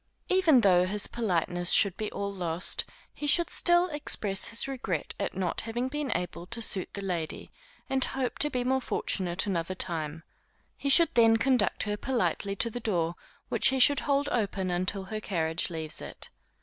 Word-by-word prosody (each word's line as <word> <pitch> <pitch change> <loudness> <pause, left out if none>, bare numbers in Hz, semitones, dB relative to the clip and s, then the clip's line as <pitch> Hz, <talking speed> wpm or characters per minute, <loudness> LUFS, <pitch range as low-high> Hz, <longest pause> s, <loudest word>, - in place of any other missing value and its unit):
Even 345 -9 +4
though 180 -3 +4
his 205 +2 0
politeness 175 -5 -1
should 200 -4 +5
be 215 - -4
all 200 0 -4
lost, 175 -2 -1 0.3
he 295 - -5
should 340 +4 +3
still 345 +1 +4
express 215 - +2
his 230 +3 +2
regret 240 - -3
at - - -3
not 185 -2 -2
having 240 +3 -3
been 295 0 -3
able 175 0 -4
to 230 +3 -5
suit 195 -4 -1
the 200 - -5
lady, 175 -4 -4 0.4
and 265 0 +1
hope 255 -3 -3
to 295 - +3
be 250 -3 -2
more 265 +1 0
fortunate 180 -7 -2
another 185 -2 -2
time; 160 -3 -3 0.5
he 280 - -3
should 335 +4 +6
then 225 -1 +5
conduct 245 -5 +1
her 210 -1 -2
politely 220 -5 -1
to 230 +3 +1
the 245 - -5
door, 175 -7 -1 0.4
which - - +3
he 265 - +1
should 280 +3 +6
hold 280 0 0
open 195 -5 -1
until 185 +2 -2
her 215 +3 -6
carriage 165 -4 -1
leaves 160 -2 -4
it. - - -8
210 Hz, 180 wpm, -28 LUFS, 180-260 Hz, 0.5 s, should